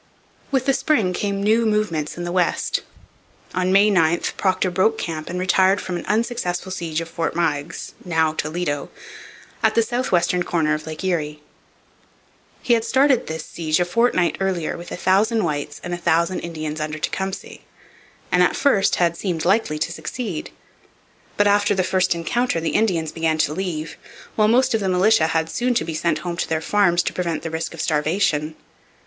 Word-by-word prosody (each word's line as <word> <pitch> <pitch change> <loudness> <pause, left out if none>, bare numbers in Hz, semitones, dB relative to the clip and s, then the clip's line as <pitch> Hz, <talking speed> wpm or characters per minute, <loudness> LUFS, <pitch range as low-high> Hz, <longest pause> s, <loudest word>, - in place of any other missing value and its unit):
With 265 -2 0
the 275 - +3
spring 225 -11 +1
came 200 +1 -2
new 220 +3 +3
movements 210 -10 -1
in 175 - -4
the 175 - -3
West. 180 -1 0 0.7
On 185 0 0
May 200 +2 +5
9 170 -3 +3 0.2
Procter 185 -1 +1
broke 200 +5 +2
camp 160 -5 -4
and 180 - -3
retired 190 +1 +3
from 180 - -4
an 175 - -6
unsuccessful 210 -5 -1
siege 170 -3 -3
of 165 - -6
Fort 165 0 -3
Meigs 165 -1 -2
(now 160 -3 +1
Toledo) 155 -2 -2 0.7
at - - +2
the 230 - +4
south 245 +3 -2
western 180 0 +2
corner 160 -4 +1
of 155 +1 -4
Lake 155 +3 -6
Erie. 150 -5 -2 1.2
He 245 - +3
had 230 -1 +2
started 265 +1 +3
this 160 0 -5
siege 160 -1 -1
a 175 - +2
fortnight 185 -2 +1
earlier 190 -4 -1
with 170 +1 -9
a - - -3
thousand 210 +5 +2
whites 145 -2 -3
and 175 - -4
a - - -2
thousand 170 +1 +1
Indians 155 -2 -5
under 155 0 -3
Tecumseh; 190 +4 -4 0.7
and 180 - +4
at 180 - +3
first 210 -9 +3
had 170 -1 +1
seemed 170 -3 -3
likely 190 -5 +2
to 160 - -2
succeed. 170 +3 -5 0.9
But 205 - +4
after 205 0 +3
the 185 - +1
first 185 -1 +1
encounter 205 +4 0
the 165 0 -1
Indians 170 -8 +1
began 160 -1 0
to 150 -1 +1
leave; 165 -3 -4 0.4
while 215 -1 +4
most 245 +4 +3
of 225 - +2
the 195 -2 -1
militia 185 -1 +4
had 160 0 0
soon 245 +8 -1
to - - +1
be 165 - -4
sent 165 +2 0
home 170 -1 -3
to - - -1
their 160 -1 +1
farms 175 0 +2
to - - -2
prevent 170 -3 -2
the 165 - -4
risk 160 +1 -4
of 165 - -5
starvation. 155 0 0
175 Hz, 185 wpm, -22 LUFS, 160-200 Hz, 1.2 s, May